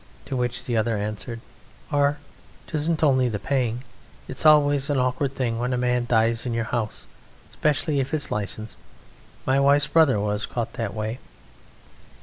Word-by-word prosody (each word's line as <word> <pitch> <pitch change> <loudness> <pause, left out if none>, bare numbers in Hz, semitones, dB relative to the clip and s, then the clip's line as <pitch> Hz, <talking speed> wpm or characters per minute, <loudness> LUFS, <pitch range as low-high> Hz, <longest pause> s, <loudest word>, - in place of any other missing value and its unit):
To 135 - -4
which 125 -1 -2
the 120 - -1
other 110 0 +1
answered: 105 +3 -4 0.5
"Ar, 145 0 +2 0.5
'tisn't 160 +1 -1
only 130 -4 +4
the 105 - -2
paying: 125 0 -1 0.4
it's - - 0
always 145 -2 +5
an 145 - +1
awkward 130 +2 0
thing 115 -3 -1
when 125 +1 -1
a - - 0
man 125 -1 0
dies 115 0 +2
in 120 -2 -2
your 115 - 0
house, 110 -1 -3 0.5
specially 150 -1 +1
if 135 +2 -2
it's 150 -2 -2
licensed. 105 - -4 0.7
My 135 +1 +3
wife's 140 +1 +4
brother 155 -9 +4
was 105 +2 -1
caught 120 -2 -3
that 115 -5 -4
way." 110 +3 -3
125 Hz, 160 wpm, -24 LUFS, 115-140 Hz, 0.7 s, always